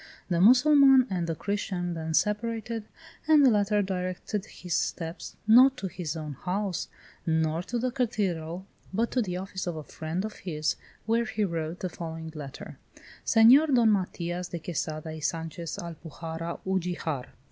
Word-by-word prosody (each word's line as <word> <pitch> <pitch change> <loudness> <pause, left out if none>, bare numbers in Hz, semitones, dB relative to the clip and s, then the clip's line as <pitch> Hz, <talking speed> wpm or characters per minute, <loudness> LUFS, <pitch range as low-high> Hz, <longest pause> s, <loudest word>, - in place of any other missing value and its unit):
The 170 -1 +2
Mussulman 270 +3 +7
and 175 -3 -1
the 165 - -1
Christian 185 -2 -2
then 160 -1 -3
separated, 225 +1 -1 0.4
and 305 -3 +7
the 255 - +7
latter 205 0 +2
directed 190 +2 -3
his 180 -2 -6
steps, 165 +1 -3
not 255 +5 +7
to 200 - -5
his 175 -3 -4
own 155 -2 -5
house, 185 +3 -2 0.4
nor 160 0 +1
to 240 +7 -3
the 250 +2 0
cathedral, 190 -8 -2 0.3
but 225 +5 0
to 255 - +2
the 180 -5 -2
office 190 0 -5
of 175 - -2
a 155 - -6
friend 160 +6 -4
of 215 - -7
his, 155 -4 -2 0.3
where 230 +1 +2
he 215 -1 -1
wrote 165 -2 -3
the 185 - -2
following 160 -1 -6
letter: 145 -4 -8 0.4
"Senor 245 +7 +7
Don 240 -6 +4
Matias 180 -2 -1
de 175 - -5
Quesada 155 -1 -4
y 155 - -7
Sanchez, 165 +1 -3
Alpujarra, 165 0 -6
Ugijar. 175 -7 -2
180 Hz, 160 wpm, -28 LUFS, 165-220 Hz, 0.4 s, Mussulman